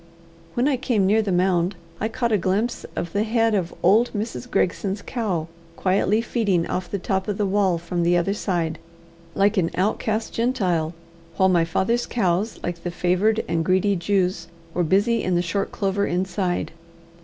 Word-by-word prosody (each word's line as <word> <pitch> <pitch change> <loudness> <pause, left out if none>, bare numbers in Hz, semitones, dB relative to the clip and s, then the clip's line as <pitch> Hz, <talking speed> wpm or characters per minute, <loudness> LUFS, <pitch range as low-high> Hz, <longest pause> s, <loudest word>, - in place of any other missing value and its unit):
When 245 +3 +2
I 280 -3 +2
came 235 -6 +1
near 215 +3 +4
the 205 -3 -2
mound, 180 0 +2 0.2
I 220 - 0
caught 235 +1 -1
a 215 - +4
glimpse 200 +7 -1
of 170 - -4
the 205 - +1
head 225 0 +2
of 185 -4 0
old 215 +7 +5
Mrs. 225 +3 -4
Gregson's 195 +1 0
cow 195 -10 -2 0.3
quietly 195 +4 +2
feeding 205 -8 0
off 180 0 -3
the 200 - -2
top 190 0 -2
of 205 -2 -2
the 210 - +1
wall 190 -2 +2
from 170 +1 -3
the 175 +1 +3
other 175 +3 +1
side, 170 -6 -2 0.6
like 200 +2 +3
an 170 -3 +2
outcast 215 +3 -1
Gentile; 180 -9 0 0.4
while 190 0 +4
my 170 -2 +3
father's 230 +9 0
cows, 195 -1 0
like 175 -1 -4
the 175 - -3
favoured 185 +6 +1
and 165 -1 0
greedy 190 +3 +2
Jews, 180 -1 0 0.3
were 180 - +1
busy 200 +8 +2
in 185 - 0
the 175 - +2
short 195 +3 -2
clover 200 0 0
inside. 180 0 -1
190 Hz, 180 wpm, -23 LUFS, 175-215 Hz, 0.6 s, old